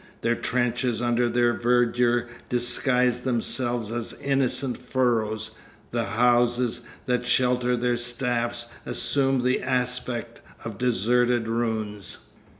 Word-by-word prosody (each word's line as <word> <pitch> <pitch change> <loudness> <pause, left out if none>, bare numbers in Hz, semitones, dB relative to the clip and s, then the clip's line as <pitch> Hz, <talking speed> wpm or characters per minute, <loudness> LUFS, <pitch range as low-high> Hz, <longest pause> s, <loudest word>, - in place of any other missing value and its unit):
Their 115 - +2
trenches 120 -1 -1
under 120 0 +1
their 120 0 +2
verdure 120 0 +2 0.2
disguise 125 0 +1
themselves 120 -2 -1
as 120 -1 -4
innocent 135 -2 0
furrows; 110 -4 0 0.4
the 115 -1 -1
houses 120 +2 +2 0.2
that 125 -1 0
shelter 125 -1 +2
their 120 0 +1
staffs 120 -1 -1 0.2
assume 135 +1 +1
the 130 +1 +1
aspect 125 -2 -2 0.2
of 110 -3 -6
deserted 120 0 +2
ruins. 110 -3 -3
120 Hz, 105 wpm, -25 LUFS, 120-125 Hz, 0.4 s, Their